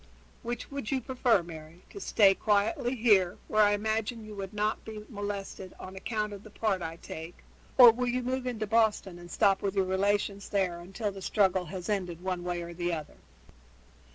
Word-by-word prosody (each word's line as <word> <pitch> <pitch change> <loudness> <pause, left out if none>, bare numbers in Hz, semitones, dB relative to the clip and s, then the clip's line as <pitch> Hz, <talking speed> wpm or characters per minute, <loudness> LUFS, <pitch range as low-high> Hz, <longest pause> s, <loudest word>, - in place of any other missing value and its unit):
Which 240 +2 -5
would 275 -6 -4
you 270 - +1
prefer, 245 -6 +2
Mary 165 +1 -11
to 400 - -8
stay 200 - +5
quietly 240 - +1
here, 205 -7 +4
where 215 - +3
I 205 0 +5
imagine 220 +2 -1
you 215 - -9
would 195 -2 -6
not 210 +1 -1
be 215 -1 -8
molested 200 -3 -5
on 185 +1 -9
account 210 +1 -2
of 200 - -8
the 215 - -13
part 205 -3 -1
I 165 -1 -4
take, 165 +1 -9 0.3
or 245 -3 +11
will 250 +2 -2
you 250 +1 0
move 255 +1 -2
into 225 -3 -2
Boston 210 -5 +1
and 175 0 -11
stop 195 -1 +3
with 200 -1 -2
your 195 -1 +2
relations 200 +1 0
there 185 -4 0
until 195 +4 -4
the 195 0 -9
struggle 190 -2 +2
has 180 +2 -6
ended 180 -5 -2
one 185 -2 -2
way 175 -1 -2
or 170 0 -7
the 175 0 -2
other?" 155 -3 -5
205 Hz, 195 wpm, -29 LUFS, 185-220 Hz, 0.3 s, or